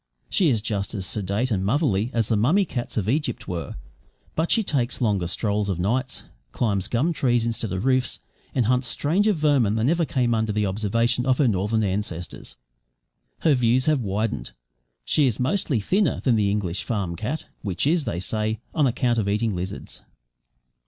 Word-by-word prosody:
She 180 -5 +3
is 110 -5 +1
just 105 -1 -2
as 95 -2 -3
sedate 105 +6 -2
and 95 -3 0
motherly 110 - +1
as 115 -4 0
the 115 - +2
mummy 155 - +3
cats 120 -8 -5
of 105 -3 0
Egypt 135 0 -1
were, 85 -2 -4 0.6
but 160 +2 0
she 225 - +3
takes 130 -9 -1
longer 100 -8 +1
strolls 105 +2 -1
of 95 - -1
nights, 125 +9 -1 0.3
climbs 100 -5 0
gum 130 +10 +1
trees 120 -5 +1
instead 115 -3 -2
of 95 +5 -2
roofs, 130 -1 +1 0.4
and 125 - +2
hunts 125 +2 +2
stranger 190 - +2
vermin 145 - +2
than 115 +6 +2
ever 170 0 +2
came 125 -6 +1
under 110 -1 0
the 105 0 0
observation 115 +5 0
of 130 -1 +3
her 140 - +3
northern 105 +1 +1
ancestors. 95 -3 -4 0.9
Her 155 - +4
views 125 0 +2
have 155 -4 +2
widened. 100 - -2 0.5
She 145 - +3
is 115 - -1
mostly 135 - +1
thinner 185 - +1
than 125 -4 +2
the 105 -2 +2
English 95 -4 -1
farm 95 -5 -2
cat 125 - -4 0.2
which 95 0 -2
is, 155 +1 +2
they 85 - -2
say, 110 +3 -2
on 150 -4 +3
account 120 -1 +1
of 100 -2 0
eating 105 +1 0
lizards. 90 +2 -6
115 Hz, 180 wpm, -24 LUFS, 100-130 Hz, 0.9 s, Her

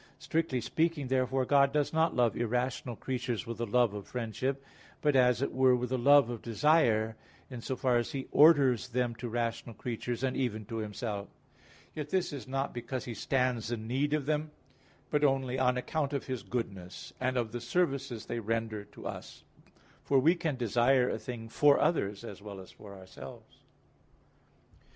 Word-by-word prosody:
Strictly 160 -6 -1
speaking, 155 +2 0
therefore, 130 0 +1
God 140 0 +4
does 150 +1 0
not 160 +1 +2
love 120 -2 +2
irrational 120 +1 -1
creatures 125 -1 -3
with 115 -2 -6
the 120 - -1
love 120 0 +3
of 105 -1 -7
friendship; 130 +3 -3 0.3
but 150 -2 +2
as 125 0 +4
it - - -2
were 130 -1 +5
with 125 0 -2
the 130 - +1
love 140 +1 +6
of 115 - -6
desire, 115 -3 +2 0.4
in 125 -2 -6
so 130 - -3
far 125 -1 +2
as 120 - -1
He 135 -1 -4
orders 140 -6 +5
them 125 -1 -1
to 120 -1 -5
rational 115 0 -3
creatures, 120 +2 -4
and 130 -1 0
even 110 -5 -2
to 115 +2 -5
Himself. 105 -1 -4 0.6
Yet 150 -1 -5
this 185 -3 0
is 135 -5 -7
not 135 +1 -2
because 120 +1 -4
He 120 - -5
stands 125 0 0
in 110 -2 -3
need 135 +5 0
of 150 -3 -2
them; 155 +1 0 0.6
but 150 -1 +2
only 135 -2 +1
on 125 -1 +2
account 145 +2 -2
of 140 - -2
His 130 -4 -4
goodness, 95 -4 -5
and 130 0 0
of 115 -3 -1
the 120 0 -5
services 135 -4 -1
they 120 - -3
render 110 -1 -2
to - - -14
us. - - -7 0.6
For 140 - +2
we 150 +6 +5
can 165 -5 -2
desire 125 +2 +3
a - - -3
thing 115 -3 -7
for 145 +5 +4
others 105 - 0
as 105 -4 -8
well 100 -2 -8
as 95 - -11
for 100 -2 -12
ourselves. 95 -8 -12
125 Hz, 185 wpm, -31 LUFS, 115-135 Hz, 0.6 s, love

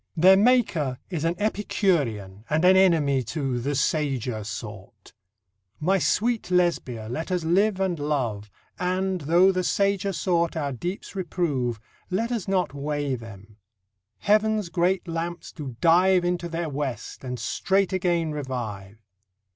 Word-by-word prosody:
Their 185 +4 +7
maker 195 - +2
is 165 -4 -2
an 165 +1 +1
Epicurean 145 - -1
and 155 +3 +2
an 185 +1 +7
enemy 160 -8 +4
to 130 +1 -2
"the 140 +4 -2
sager 130 -6 -1
sort": 100 -1 -9 0.7
My 190 +5 +2
sweetest 230 +4 0
Lesbia, 170 -11 0
let 155 - -4
us 180 -2 0
live 190 +4 +2
and 185 -4 0
love, 120 -9 -2 0.3
And, 185 0 -1
though 175 +6 +4
the 185 -1 -1
sager 200 +1 +1
sort 170 -2 0
our 145 -3 -1
deeps 175 - -5
reprove, 150 - -1 0.3
Let 225 +6 -1
us 225 -6 -2
not 185 -6 0
weigh 145 0 -2
them. 105 -3 -9 0.6
Heav'n's 215 -2 +2
great 180 +2 0
lamps 170 +1 -4
do 140 -7 -7
dive 180 +2 +4
Into 175 -1 -1
their 165 0 -3
west, 135 -7 -5
and 125 -1 -4
straight 195 0 0
again 175 -3 0
revive. 110 -8 -6
165 Hz, 140 wpm, -25 LUFS, 130-185 Hz, 0.7 s, Their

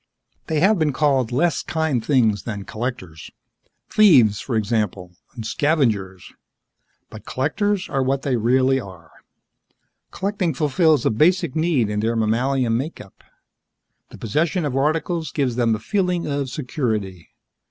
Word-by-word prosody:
They 155 -2 0
have 200 +1 +4
been 150 -3 +1
called 135 -5 +1
less 165 +6 +1
kind 160 -8 -1
things 110 -8 +2
than 105 -2 -6
collectors. 110 -9 -6 0.6
Thieves, 130 - +5
for 125 - -4
example, 100 -5 -2 0.2
and 115 -3 -7
scavengers. 110 - -1 0.8
But 110 0 -12
collectors 195 +9 -1
are 135 - -1
what 135 +1 -1
they 135 -3 0
really 130 +3 +2
are. 95 -8 -12 1.0
Collecting 190 -5 -2
fulfills 155 -1 +2
a - - +3
basic 155 - +2
need 155 -8 +1
in 105 0 -2
their 115 +2 0
mammalian 115 +2 +1
makeup; 130 - -7 0.9
the - - -12
possession 155 - -1
of 135 -3 -2
articles 160 +4 -1
gives 135 -5 -1
them 115 -2 +2
a - - -6
feeling 180 - -1
of 140 -2 -2
security. 110 - -3
130 Hz, 135 wpm, -21 LUFS, 110-155 Hz, 1.0 s, Thieves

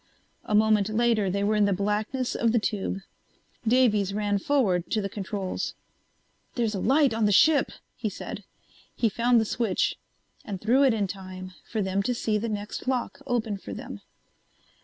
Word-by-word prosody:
A 210 - 0
moment 215 -1 +4
later 220 -2 +2
they 200 +2 -1
were 210 +1 +2
in 210 -1 +4
the 200 - +2
blackness 210 +6 -1
of 230 - +1
the - - +4
tube. 200 -2 -2 0.7
Davies 215 -5 +3
ran 205 -1 0
forward 195 -9 +1
to 220 - +1
the 200 - -1
controls. 195 -1 -4 0.8
"There's 230 -3 0
a 195 - -2
light 270 +3 +3
on 225 -1 +1
the 205 - +3
ship," 290 +8 +5 0.2
he 225 -3 -2
said. 200 +1 -7 0.5
He 230 - +2
found 235 +3 +3
the 220 - +1
switch 215 -3 0 0.4
and 200 -3 -5
threw 240 +7 +3
it 265 -5 +4
in 205 -2 0
time 185 -1 -7 0.2
for 220 -3 -1
them 190 +1 0
to 245 +5 -1
see 215 -2 0
the 230 +2 -3
next 210 +3 -5
lock 255 -2 -1
open 225 -5 -1
for - - -7
them. - - -8
215 Hz, 180 wpm, -26 LUFS, 200-235 Hz, 0.8 s, ship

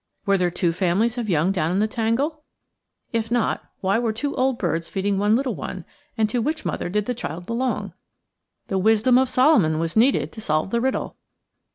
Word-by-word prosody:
Were 200 - +3
there 180 -2 +2
two 170 -1 0
families 200 +7 +1
of 225 -3 -3
young 170 +1 +2
down 170 -4 0
in 185 - 0
the 215 +2 +2
tangle? 250 +8 -1 0.7
If 225 -1 -1
not, 235 -2 0 0.2
why 195 +3 +2
were 235 -2 0
two 280 +6 -3
old 260 -1 +1
birds 165 -4 -1
feeding 195 0 -1
one 210 +2 +3
little 260 +1 0
one, - - -6 0.3
and 220 -1 +3
to 245 - 0
which 310 +6 -2
mother - - -2
did 210 +2 0
the 250 - -1
child 175 -7 -6
belong? 230 -4 -2 0.7
The 195 - -1
wisdom 225 +5 +4
of 260 -1 +1
Solomon 255 - +4
was 165 0 -2
needed 245 +5 +3
to 220 - -9
solve 155 0 -1
the 235 - +1
riddle. 265 +1 -2
220 Hz, 200 wpm, -23 LUFS, 185-245 Hz, 0.7 s, wisdom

